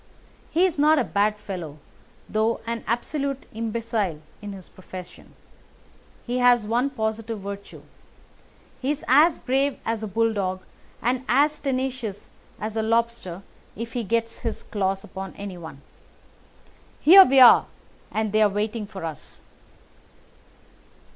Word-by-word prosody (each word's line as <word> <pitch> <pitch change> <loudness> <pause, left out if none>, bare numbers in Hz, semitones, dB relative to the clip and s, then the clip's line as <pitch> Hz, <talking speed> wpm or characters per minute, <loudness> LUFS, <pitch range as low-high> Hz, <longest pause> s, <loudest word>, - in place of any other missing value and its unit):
He 345 +3 +3
is 345 -6 -1
not 305 +2 +5
a 265 - +3
bad 205 +3 +1
fellow, 175 -8 -7 0.5
though 220 +2 0
an 230 0 -4
absolute 275 +4 -2
imbecile 220 -6 -2 0.2
in 205 -1 -6
his 190 -2 -10
profession. 185 -1 -12 0.9
He 245 +1 -1
has 245 -3 +4
one 240 +5 +1
positive 220 -3 -3
virtue. 200 0 -8 1.0
He 265 - -1
is 295 0 -2
as 305 +5 +5
brave 270 +2 0
as 225 -1 -1
a 215 - -3
bulldog 200 -3 -1 0.4
and 250 +2 0
as 295 +4 +3
tenacious 255 -6 -3 0.3
as 215 0 -4
a 220 - +1
lobster 230 -5 -1 0.3
if 230 +1 -6
he 245 - -2
gets 230 +2 -1
his 230 -3 -4
claws 195 -2 -2
upon 190 -1 -8
anyone. 175 -8 -8 1.2
Here 380 +5 +10
we 270 -5 +4
are, 250 -2 +8 0.4
and 215 -1 -1
they 215 +1 +2
are 210 - +5
waiting 210 +1 -2
for 195 -5 -7
us." 160 -3 -8
225 Hz, 135 wpm, -24 LUFS, 200-250 Hz, 1.2 s, Here